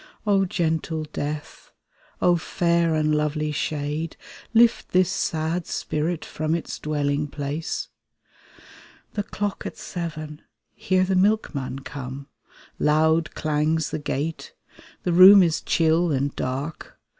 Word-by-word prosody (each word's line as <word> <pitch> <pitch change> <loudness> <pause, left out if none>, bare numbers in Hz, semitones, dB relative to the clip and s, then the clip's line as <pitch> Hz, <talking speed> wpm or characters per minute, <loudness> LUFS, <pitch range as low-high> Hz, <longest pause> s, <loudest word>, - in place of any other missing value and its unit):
"O 195 -2 +3
gentle 160 -2 -1
death! 150 0 -5 0.5
O 175 - +5
fair 170 -1 +1
and 155 0 +1
lovely 150 0 0
shade, 150 +2 -3 0.3
Lift 235 0 +4
this 185 -1 +4
sad 160 +2 -1
spirit 155 +2 -2
from 155 +1 -2
its 170 - -5
dwelling 145 -1 -1
place 145 +2 -4 0.6
!" - - -23
The 210 - -1
clock 205 0 -4
at - - -8
seven! 155 -3 -6 0.3
Hear 185 0 +1
the 190 0 0
milkman 185 -10 +1
come. 135 0 -7 0.5
Loud 160 +1 +2
clangs 155 +1 0
the - - -2
gate; 160 - -4 0.5
the 175 - 0
room 190 +2 +9
is 165 -3 0
chill 165 +1 +2
and 140 0 -1
dark. 140 +5 -5
160 Hz, 120 wpm, -24 LUFS, 150-175 Hz, 0.6 s, room